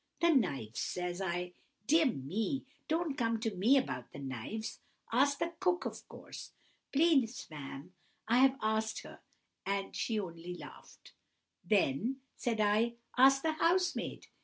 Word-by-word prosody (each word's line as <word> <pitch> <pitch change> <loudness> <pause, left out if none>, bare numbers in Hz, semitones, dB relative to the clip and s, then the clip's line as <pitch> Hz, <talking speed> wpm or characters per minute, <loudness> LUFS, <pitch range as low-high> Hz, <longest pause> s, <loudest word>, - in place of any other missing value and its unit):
"'No 340 - +4
knives!' 135 - 0
says 180 +1 -2
I. 180 -1 -2 0.3
'Dear 315 +4 +5
me, 215 - -2 0.2
don't 320 -2 0
come 230 -4 0
to 225 -3 -1
me 225 +10 +5
about 125 - -2
the - - -10
knives. 140 - -5 0.3
Ask 280 +4 +3
the 340 0 -2
cook, 365 -1 +1
of - - -6
course.' - - -10 0.4
"'Please, 275 -6 +3
ma'am, 145 +3 -8 0.3
I 235 +3 +4
have 270 0 +5
asked 220 0 0
her, - - -12 0.4
and 195 0 -2
she 225 -2 0
only 175 -2 -6
laughed.' - - -13 0.5
"'Then,' 210 - +2 0.2
said 230 -3 -1
I, 215 +3 +3 0.2
'ask 270 +1 +6
the 320 - +2
housemaid. 345 +3 +1
225 Hz, 140 wpm, -33 LUFS, 180-275 Hz, 0.5 s, ask